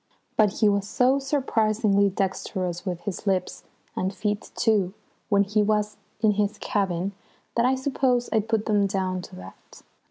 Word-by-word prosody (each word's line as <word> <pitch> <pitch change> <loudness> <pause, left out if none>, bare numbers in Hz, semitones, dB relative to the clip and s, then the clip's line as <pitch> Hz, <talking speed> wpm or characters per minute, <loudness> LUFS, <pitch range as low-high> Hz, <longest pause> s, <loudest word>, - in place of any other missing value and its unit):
But 210 -3 +4
he 215 - +6
was 200 -1 +1
so 260 +2 +3
surprisingly 220 -7 +2
dexterous 185 -1 -3
with 175 -2 -3
his 200 +3 -5
lips, 185 -2 -1 0.3
and 185 +1 -1
feet 205 +1 -3
too, 210 -4 +1 0.3
when 200 -2 +4
he 210 +2 +1
was 210 0 0 0.2
in 215 -2 +5
his 210 +1 0
cabin 190 -2 -1 0.4
that 235 +1 +3
I 260 - +3
suppose 260 -2 +1
I 220 - +4
put 220 0 -1
them 205 -2 +2
down 185 -2 -1
to - - -11
that. 90 +1 -13
205 Hz, 160 wpm, -25 LUFS, 190-220 Hz, 0.4 s, he